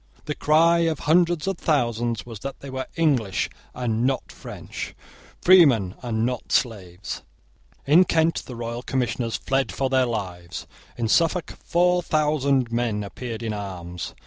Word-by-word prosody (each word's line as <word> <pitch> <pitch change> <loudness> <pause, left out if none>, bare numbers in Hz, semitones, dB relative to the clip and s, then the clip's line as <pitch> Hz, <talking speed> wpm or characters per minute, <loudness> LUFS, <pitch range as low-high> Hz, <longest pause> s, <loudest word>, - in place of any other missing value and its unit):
The 150 - -2
cry 165 +3 +4
of 165 -2 +1
hundreds 170 0 +3
of 195 -2 -2
thousands 120 -6 0
was 115 -4 -8
that 135 +5 -6
they 140 - -8
were 130 0 -4
English 135 - +1 0.2
and 115 -2 -1
not 130 +1 0
French, - - -8 0.5
freemen 140 - +6
and 115 -2 -1
not 125 -1 -3
slaves. 100 -6 -1 0.6
In 165 +6 +6
Kent 165 -1 +1
the 125 - -7
royal 115 +1 -4
commissioners 120 -3 -1
fled 135 0 0
for 135 -1 -1
their 130 -1 +3
lives. 90 -6 -5 0.3
In 115 -2 0
Suffolk 165 +7 +2
four 180 +1 +3
thousand 140 -6 +1
men 115 -3 0
appeared 115 +3 -6
in 110 -2 -2
arms. 90 -4 -6
125 Hz, 145 wpm, -24 LUFS, 115-155 Hz, 0.6 s, freemen